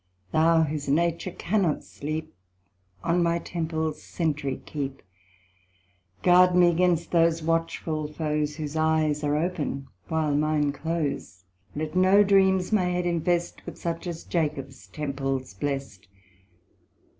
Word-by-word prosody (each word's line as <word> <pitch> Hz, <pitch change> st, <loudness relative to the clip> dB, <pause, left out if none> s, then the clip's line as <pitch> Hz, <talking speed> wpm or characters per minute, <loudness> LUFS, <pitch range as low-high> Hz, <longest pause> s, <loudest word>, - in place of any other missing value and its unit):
Thou 160 Hz, +1 st, +4 dB
whose 150 Hz, -2 st, -3 dB
nature 170 Hz, +4 st, +1 dB
cannot 180 Hz, -3 st, 0 dB
sleep, 155 Hz, +2 st, -5 dB, 0.7 s
On 170 Hz, +1 st, +2 dB
my 170 Hz, 0 st, +2 dB
temples 160 Hz, -2 st, -3 dB
centry 150 Hz, -5 st, -2 dB
keep; 140 Hz, -2 st, -5 dB, 1.2 s
Guard 180 Hz, 0 st, +6 dB
me 175 Hz, -1 st, +6 dB
'gainst 170 Hz, -1 st, +1 dB
those 165 Hz, -1 st, +3 dB
watchful 160 Hz, -2 st, -1 dB
foes, 150 Hz, -1 st, -1 dB
Whose 150 Hz, -1 st, -5 dB
eyes 155 Hz, -1 st, +1 dB
are 145 Hz, 0 st, +1 dB
open 155 Hz, -5 st, -2 dB, 0.2 s
while 160 Hz, -3 st, 0 dB
mine 150 Hz, 0 st, +2 dB
close. 145 Hz, -, -3 dB, 0.3 s
Let 155 Hz, +3 st, -4 dB
no 190 Hz, +3 st, +6 dB
dreams 190 Hz, -1 st, +3 dB
my 205 Hz, -4 st, +3 dB
head 180 Hz, 0 st, 0 dB
infest, 175 Hz, 0 st, 0 dB
But -, -, -8 dB
such 170 Hz, +1 st, -4 dB
as 170 Hz, -2 st, -5 dB
Jacob's 145 Hz, -5 st, -3 dB
temples 135 Hz, -4 st, -3 dB
blest. 135 Hz, -4 st, -4 dB
160 Hz, 120 wpm, -26 LUFS, 150-170 Hz, 1.2 s, Guard